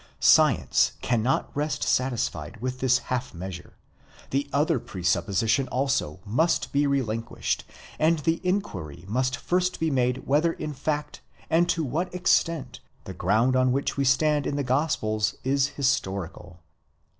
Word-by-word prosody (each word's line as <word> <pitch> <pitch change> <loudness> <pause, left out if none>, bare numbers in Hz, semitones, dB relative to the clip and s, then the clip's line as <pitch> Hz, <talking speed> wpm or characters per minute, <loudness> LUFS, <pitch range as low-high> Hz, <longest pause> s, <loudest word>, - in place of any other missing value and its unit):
Science - - +4
cannot 120 +2 0
rest 150 +1 -1
satisfied 125 -2 -1
wiih 130 +2 -3
this 125 -1 +3 0.2
half 125 -4 -3
measure: 90 0 -8 0.5
the 140 +1 -1
other 150 0 +2
presupposition 100 +7 0
also 135 - -1
must 145 +12 +1
be 145 +1 +2
relinquished, 115 -5 -2 0.3
and: 165 +2 +3
the 165 +2 0
inquiry 95 - -3
must 125 +4 0
first 180 0 0
be 160 -1 0
made 125 -1 0
whether 155 +4 +2
in 150 - -5
fact, 150 +1 -3 0.3
and 170 +2 +3
to 165 -2 +1
what 155 +7 -2
extent, 170 -4 +1 0.2
the 95 - -7
ground 110 +8 +2
on 130 0 +3
which 135 +2 -1
we 140 - 0
stand 145 +2 +2
in 140 - -2
the 145 - -1
gospels 115 -6 0
is 135 +1 +2
historical. 95 - -2
130 Hz, 140 wpm, -26 LUFS, 115-150 Hz, 0.5 s, Science